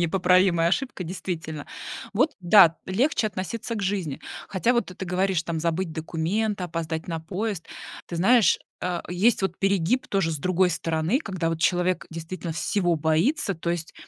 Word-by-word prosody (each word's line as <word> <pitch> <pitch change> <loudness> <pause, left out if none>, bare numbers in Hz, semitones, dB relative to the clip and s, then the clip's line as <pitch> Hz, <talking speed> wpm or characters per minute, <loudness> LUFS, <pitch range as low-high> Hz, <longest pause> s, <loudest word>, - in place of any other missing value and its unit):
непоправимая 180 0 +3
ошибка, 200 0 -1
действительно. 160 -3 -5 0.5
Вот 260 +9 +3
да, 175 -2 +7
легче 230 +5 +1
относиться 215 +4 -4
к 205 - -3
жизни. 185 -8 -2 0.3
Хотя 205 +5 +1
вот 235 -4 +1
ты 185 - -10
ты 190 - -6
говоришь 185 -1 0
там 165 0 -3
забыть 170 +1 -1
документы, 180 +6 -1
опоздать 160 -1 -4
на 165 -1 -3
поезд. 190 +2 -4 0.4
Ты 170 - -4
знаешь, 225 +6 +5 0.2
э, 180 -1 -2
есть 195 +5 +2
вот 190 -2 -1
перегиб 195 +5 +1
тоже, 195 -5 +1
с 155 - -3
другой 185 +3 +2
стороны, 165 +6 0
когда 185 - -2
вот 165 -1 -2
человек 180 +1 +1
действительно 165 +1 -5
всего 175 +1 0
боится. 165 - +1
То 170 +1 -3
есть, 170 -2 -4
180 Hz, 160 wpm, -25 LUFS, 165-195 Hz, 0.5 s, да